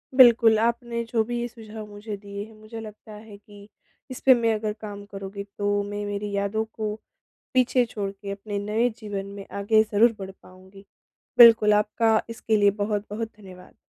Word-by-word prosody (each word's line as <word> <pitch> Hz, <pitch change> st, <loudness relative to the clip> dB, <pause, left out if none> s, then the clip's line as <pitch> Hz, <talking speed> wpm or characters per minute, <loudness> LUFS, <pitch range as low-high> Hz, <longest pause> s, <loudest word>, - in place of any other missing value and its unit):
बिल्कुल, 235 Hz, -3 st, +7 dB
आपने 235 Hz, 0 st, -1 dB
जो 230 Hz, -1 st, 0 dB
भी 240 Hz, +1 st, -3 dB
ये 240 Hz, -, -2 dB
सुझाव 220 Hz, -2 st, -10 dB
मुझे 205 Hz, +1 st, -7 dB
दिए 200 Hz, 0 st, -7 dB
हैं 220 Hz, -, -16 dB
मुझे 215 Hz, +1 st, -10 dB
लगता 215 Hz, 0 st, -11 dB
है 210 Hz, -1 st, -12 dB
कि 205 Hz, 0 st, -16 dB, 0.4 s
इस 255 Hz, -, -6 dB
पे 265 Hz, -, +9 dB
मैं 230 Hz, -2 st, +1 dB
अगर 215 Hz, 0 st, -3 dB
काम 205 Hz, -2 st, -7 dB
करूँगी 195 Hz, 0 st, -6 dB
तो 205 Hz, 0 st, 0 dB
मैं 205 Hz, 0 st, -5 dB
मेरी 205 Hz, 0 st, -4 dB
यादों 200 Hz, +2 st, -1 dB
को 215 Hz, -1 st, -3 dB, 0.6 s
पीछे 255 Hz, -1 st, +3 dB
छोड़ 200 Hz, -2 st, -3 dB
के 200 Hz, 0 st, -8 dB
अपने 200 Hz, 0 st, -5 dB
नए 215 Hz, +4 st, 0 dB
जीवन 205 Hz, -3 st, -5 dB
में 200 Hz, -, -8 dB
आगे 215 Hz, +2 st, +4 dB
ज़रूर 225 Hz, +2 st, +4 dB
बढ़ 190 Hz, 0 st, -6 dB
पाऊँगी। 190 Hz, +2 st, -16 dB, 0.5 s
बिल्कुल 225 Hz, -3 st, +8 dB
आपका 220 Hz, +1 st, +2 dB
इसके 225 Hz, -1 st, -1 dB
लिए 205 Hz, -1 st, +4 dB
बहुत-बहुत 210 Hz, +2 st, -3 dB
धन्यवाद। 185 Hz, -3 st, -14 dB
210 Hz, 175 wpm, -25 LUFS, 200-225 Hz, 0.6 s, पे